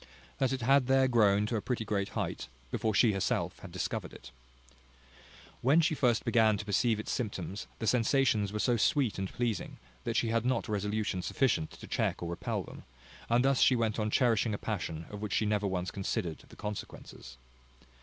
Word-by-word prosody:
That 135 -1 +2
it 135 - -2
had 135 -1 +4
there 135 0 +4
grown 105 -4 +4
to 115 - -2
a - - -2
pretty 120 -1 -2
great 100 -2 -1
height - - -3 0.2
before 110 -3 0
she 110 +2 +5
herself 95 -2 -1
had - - -10
discovered - - -3
it. 65 0 -12 1.3
When 140 +6 +4
she 165 -1 +2
first 125 -6 +1
began 110 -3 +4
to 105 - -6
perceive 105 +2 +1
its 110 - -4
symptoms, 100 -4 -4
the 110 - -4
sensations 115 -2 +2
were 105 - -3
so 120 +2 +2
sweet 120 -1 +1
and 95 -1 -3
pleasing, 120 -3 -2 0.3
that - - -2
she 115 - +1
had 115 0 +1
not 125 -1 0
resolution 105 -1 -1
sufficient 115 - 0
to - - -11
check - - -1
or 85 - -3
repel 85 - -3
them; - - -11 0.5
and 120 +2 +3
thus 135 -1 +3
she 130 - +6
went 115 -2 0
on 105 0 0
cherishing 115 -2 +2
a - - -4
passion 85 -7 -4
of 105 0 -7
which 105 -2 -3
she 110 - +2
never 105 -1 +1
once 90 -1 -2
considered 90 -4 -3
the - - -14
consequences. 95 -10 -8
110 Hz, 195 wpm, -31 LUFS, 100-120 Hz, 1.3 s, she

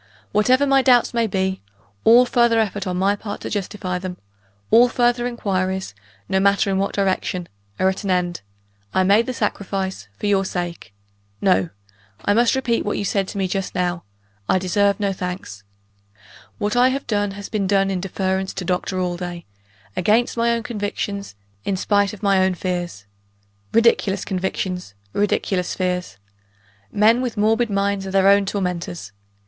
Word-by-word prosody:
Whatever 255 +7 +3
my 275 -1 +4
doubts 250 -3 +4
may 230 -1 +1
be, 190 -1 -1 0.4
all 240 +3 +7
further 235 -2 +3
effort 205 -3 -1
on 180 -1 -2
my 195 +2 +2
part 205 0 -6
to - - -5
justify 195 -3 -3
them 180 -1 -6 0.5
all 240 +2 +7
further 240 0 +1
inquiries, 190 - -2 0.3
no 190 - +1
matter 200 0 +3
in 190 - +1
what 195 - -1
direction 185 -2 -1 0.3
are 190 - +3
at 190 +2 -1
an 200 - -3
end: 180 -1 0 0.5
I 190 - +4
made 205 +5 +4
the - - -1
sacrifice, 195 - -3
for - - -5
your 200 -1 +3
sake. 175 - -5 0.5
No! 95 -4 +2 0.6
I 205 - +3
must 235 +3 +3
repeat 250 -3 0
what 205 - -2
you 205 - -2
said 195 0 0
to - - -7
me 190 -1 0
just 195 0 -3
now; 175 -1 -1 0.5
I - - +4
deserve 200 +3 +1
no 200 -1 0
thanks. 180 - -6 1.0
What 210 +2 -1
I 245 +1 +5
have 270 +2 -1
done, 205 -3 0
has 200 - -6
been 205 -3 -1
done 195 0 +2
in 185 -2 -2
deference 190 0 -2
to 185 - -4
Doctor 180 +1 -1
Allday 175 -1 -3 0.5
against 220 +6 +2
my 235 0 +2
own 230 -1 -1
convictions; 205 - -4 0.3
in 195 - -1
spite 205 +1 +2
of 215 -1 -12
my 195 -2 +4
own 190 -1 +1
fears. 175 - -4 0.7
Ridiculous 225 -4 +3
convictions! 185 - -3 0.2
ridiculous 195 -3 0
fears! 180 - -2 0.7
Men 220 +4 +4
with 245 -3 -3
morbid 225 +3 +2
minds 200 -1 0
are - - -5
their 195 0 +4
own 200 0 +4
tormentors. 180 - -3
195 Hz, 165 wpm, -21 LUFS, 185-215 Hz, 1.0 s, all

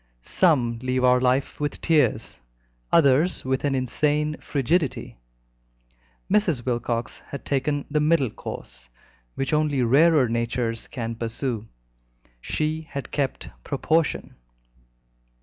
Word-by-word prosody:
Some 125 - +2
leave 130 0 0
our 125 0 +5
life 130 +2 +1
with 145 0 -2
tears, 150 -8 +1 0.5
others 155 +2 +3
with 130 0 -1
an 140 -2 +1
insane 150 +4 0
frigidity; 145 - -1 1.1
Mrs. 185 - +1
Wilcox 120 -1 -2
had 140 - -8
taken 145 +1 -1
the 150 +1 0
middle 150 -6 +2
course, - - -9 0.5
which 135 +2 -2
only 150 -4 +2
rarer 145 +3 +5
natures 115 0 -2
can 115 -2 -4
pursue. 115 0 -3 0.7
She 155 - -1
had 140 - -6
kept 140 -3 -2
proportion. 160 0 0
135 Hz, 110 wpm, -24 LUFS, 120-150 Hz, 1.1 s, our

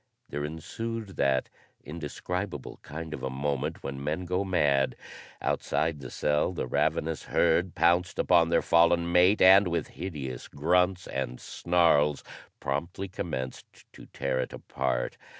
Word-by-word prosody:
There 75 - -3
ensued 110 +8 -5
that 65 -1 +2 0.4
indescribable 85 +1 -5
kind 80 +1 -7
of - - -6
a 65 - -2
moment 70 +1 -2
when 70 0 -5
men 80 +5 -2
go 90 +2 0
mad. 75 -8 +2 0.5
Outside 80 -1 0
the 65 -2 -8
cell 75 +4 0
the 85 - -3
ravenous 80 +4 0
herd 85 +1 +2
pounced 85 +2 +2
upon 85 -2 +4
their - - +2
fallen 85 0 +4
mate 90 +4 +5
and 95 +1 +8
with 85 -1 -2
hideous 70 -9 -6
grunts 90 +5 +1
and 65 -2 -4
snarls 80 -4 +2 0.4
promptly 85 +8 -3
commenced 65 -8 -5 0.3
to - - -13
tear 65 - -2
it - - -3
apart. - - -2
80 Hz, 135 wpm, -28 LUFS, 70-90 Hz, 0.5 s, and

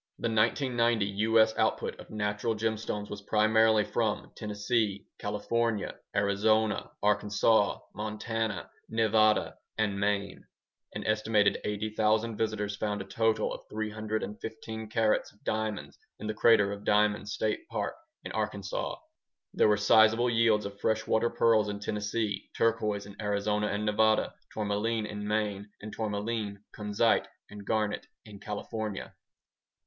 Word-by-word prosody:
The 115 - -1
1990 115 0 +2 0.2
U.S. 110 -1 +5
output - - 0
of - - -11
natural 105 +1 -1
gemstones 110 -1 -2
was 105 -1 -6
primarily 110 +1 +4
from 110 0 -1
Tennessee, 105 -1 -1
California, 115 -3 -1 0.2
Arizona, 105 +2 +2
Arkansas, 105 0 +3 0.2
Montana, 110 +1 -3 0.2
Nevada, 110 -1 +2 0.2
and 105 -3 0
Maine. 100 -1 -1 0.5
An - - -4
estimated 110 -1 +2
80,000 110 +2 0
visitors 105 -1 -1
found 105 0 -2
a 95 - -5
total 110 +3 +1
of - - -7
315 110 +1 -4
carats 110 -1 +1
of 105 - -29
diamonds 110 -1 -3 0.2
in 110 - -8
the 110 - -1
Crater 110 -3 +4
of 100 0 -6
Diamonds 105 0 +2
State 110 -1 -2
Park 110 -3 -2 0.3
in - - -6
Arkansas. - - -3 0.6
There - - +4
were 105 -1 +4
sizeable 110 +3 +5
yields 115 -2 +3
of 100 0 -7
freshwater 110 +2 +1
pearls 110 -3 +3
in 100 0 -4
Tennessee, 105 +1 -2
turquoise 105 -3 +1
in 100 +1 -10
Arizona 105 0 0
and 105 +1 -2
Nevada, 110 +1 +3 0.2
tourmaline 105 +1 -1
in 105 -1 -5
Maine, 105 -1 -1
and 110 0 -8
tourmaline, 105 -1 -3
kunzite, 105 +2 +2 0.2
and 105 -1 -9
garnet 105 -2 0 0.2
in 105 -2 -11
California. 105 0 -5
105 Hz, 125 wpm, -29 LUFS, 105-110 Hz, 0.6 s, U.S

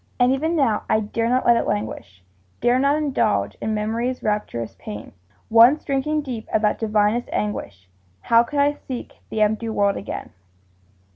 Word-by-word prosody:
And 245 +1 +4
even 315 +5 0
now, 250 -9 +2
I 220 - +3
dare 230 +2 -2
not 255 +1 +1
let 235 -1 +5
it - - -1
languish, 105 -3 -4 0.4
Dare 245 +1 +3
not 280 +2 +3
indulge 255 - 0
in 215 0 -1
Memory's 230 +4 -2
rapturous 210 - -2
pain; 105 +1 -8 0.4
Once 235 +7 +6
drinking 295 +2 0
deep 245 -5 -6
of 220 - +1
that 210 - +1
divinest 215 +2 +1
anguish, 100 - -4 0.3
How 230 - +5
could 285 +5 -4
I 285 +1 +3
seek 255 -2 -7
the 215 -1 +1
empty 220 +2 0
world 200 -2 +1
again? - - -6
230 Hz, 165 wpm, -22 LUFS, 210-260 Hz, 0.4 s, Once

